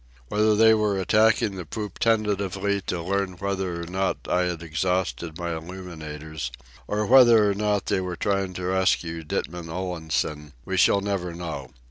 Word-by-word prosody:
Whether 105 0 +3
they 110 +1 +6
were 105 -2 +1
attacking 110 0 +3
the 90 - -4
poop 105 +4 -6
tentatively 100 -3 +1
to 85 -2 -2
learn 100 +1 -1
whether 95 -2 -3
or - - -5
not 95 +3 -1
I 90 0 +2
had 85 -2 -3
exhausted 85 -2 -1
my 85 -2 -3
illuminators, 80 -5 -7 0.4
or 105 +1 0
whether 120 -3 +7
or 100 - +2
not 105 0 0
they 95 - 0
were 90 -1 -4
trying 100 0 -1
to 90 - -5
rescue 90 -3 +1
Ditman 80 +2 -4
Olansen, 80 -4 -3
we 95 - -2
shall 100 +2 +4
never 95 -4 -2
know. 75 -7 -6
95 Hz, 160 wpm, -25 LUFS, 85-100 Hz, 0.4 s, whether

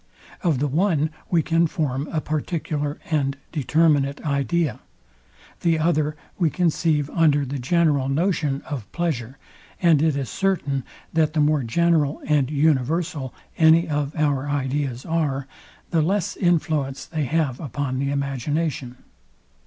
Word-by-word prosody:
Of 165 -7 +2
the 145 +3 0
one 155 0 +1 0.2
we 170 -3 +3
can 165 +2 +2
form 145 -3 -2
a 160 - 0
particular 150 -1 -2
and 140 -3 +1
determinate 150 -2 +2
idea: 145 -1 0 0.8
The 165 -1 +2
other 155 -2 +1 0.2
we 170 -3 +3
conceive 155 -3 +1
under 150 -4 +3
the 135 +1 -4
general 145 -1 +2
notion 150 -2 0
of 125 -10 -6
pleasure; 135 -7 -2 0.4
and 165 -5 +4
it 155 -2 +2
is 135 -2 -2
certain, 145 -8 -1 0.3
that 155 -2 +2
the 160 - 0
more 150 0 +3
general 150 +4 +1
and 145 -4 +2
universal 150 0 0 0.3
any 165 +1 +6
of 150 -1 -2
our 145 -2 0
ideas 135 -2 -2
are, 150 -5 -1 0.5
the 165 -2 +3
less 195 +4 0
influence 155 -6 0
they 155 -3 -2
have 140 -2 0
upon 140 -3 -3
the 140 0 0
imagination. 140 -1 -2
150 Hz, 135 wpm, -23 LUFS, 140-165 Hz, 0.8 s, any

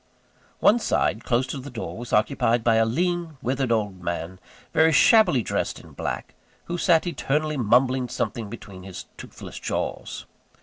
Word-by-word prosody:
One 225 +4 +5
side, 115 - 0
close 125 +1 +1
to 135 - -5
the 135 +2 -8
door, 120 -3 -6
was 120 +1 -8
occupied 115 +2 +2
by 115 -1 +4
a 115 - +4
lean, 170 +4 -1
withered 130 0 0
old 105 -5 -1
man, 85 +1 -4 0.3
very 160 0 +5
shabbily 175 - +5
dressed - - -2
in - - -15
black, - - -5 0.3
who 175 0 -4
sat 170 -2 +4
eternally 155 -1 -1
mumbling 125 +1 +2
something 115 -3 -3
between 100 -4 -10
his 95 -1 -8
toothless - - -10
jaws. - - -4
125 Hz, 160 wpm, -24 LUFS, 110-155 Hz, 0.3 s, One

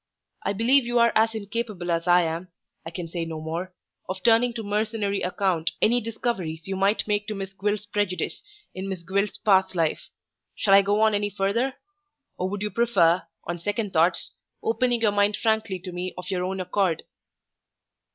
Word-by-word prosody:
I - - -1
believe 245 +6 +4
you 240 0 -1
are 235 0 +5
as 225 +1 +3
incapable 205 -4 -3
as 170 +1 -1
I 175 0 +6
am 165 +2 -3 0.4
I 165 - -6
can 170 0 -6
say 170 +1 -3
no 165 -1 -5
more 165 +4 -4 0.4
of 185 0 -4
turning 235 +1 +5
to 225 - -4
mercenary 210 -1 -1
account 180 -3 0
any 240 +2 +3
discoveries 200 -8 -3
you 195 - -2
might 195 +3 +1
make 205 -1 0
to 215 - -3
Miss 195 -1 -5
Gwilt's 205 +2 -1
prejudice 205 -3 -1 0.3
in 190 +1 -5
Miss 185 -3 -5
Gwilt's 200 +3 -1
past 190 -3 +3
life. 165 -3 0 0.5
Shall 195 - +2
I 200 - +9
go 205 +2 +1
on 220 -1 +4
any 205 0 0
further? 205 +7 0 0.6
or 185 - -2
would 205 +1 -4
you 210 - -2
prefer, 185 -6 +3 0.2
on 175 0 -4
second 205 +3 -2
thoughts, 170 +1 +2 0.3
opening 235 +1 +1
your 215 -2 +4
mind 205 0 +2
frankly 220 -3 0
to 180 +1 -8
me 180 +1 -4
of 180 +2 -6
your 180 -1 -1
own 190 +1 -3
accord?" 185 -2 0
200 Hz, 185 wpm, -25 LUFS, 180-220 Hz, 0.6 s, I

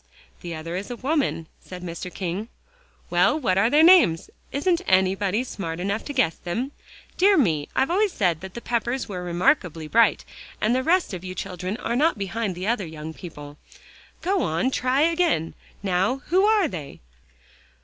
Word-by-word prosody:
"The 170 -2 -5
other 165 +2 -6
is 195 +2 -5
a 245 - -4
woman," 270 - -1 0.2
said 180 -1 -9
Mr. 175 +1 -6
King. 190 +4 -4 0.6
"Well, 305 - +3
what 190 -9 +1
are 225 +4 +4
their 300 +4 +5
names? 330 - +5 0.2
Isn't 335 +5 +1
anybody 190 +3 +2
smart 170 -9 -5
enough 200 +4 -2
to 290 - -5
guess 255 - +1
them? 235 +10 -3 0.5
Dear 390 +1 +5
me, 160 - +1
I've 270 - +2
always 405 +2 +2
said 175 - 0
that 190 -1 -9
the 235 - -6
Peppers 240 +2 -2
were 185 -4 -5
remarkably 175 - +1
bright, 230 +8 +3 0.3
and 220 +3 +2
the 255 - +2
rest 335 - +1
of 180 -1 -6
you 185 0 -6
children 185 +3 -4
are 235 -1 -2
not 305 +1 +2
behind 200 -1 -3
other 210 -4 0
young 160 0 -7
people. 150 -4 -10 0.6
Go 380 +2 +1
on, 170 +11 0
try 255 +2 +1
again. 330 - +1 0.3
Now 195 +8 0
who 375 +4 +4
are 425 -4 +4
they?" 155 -7 -8
200 Hz, 170 wpm, -24 LUFS, 175-275 Hz, 0.6 s, their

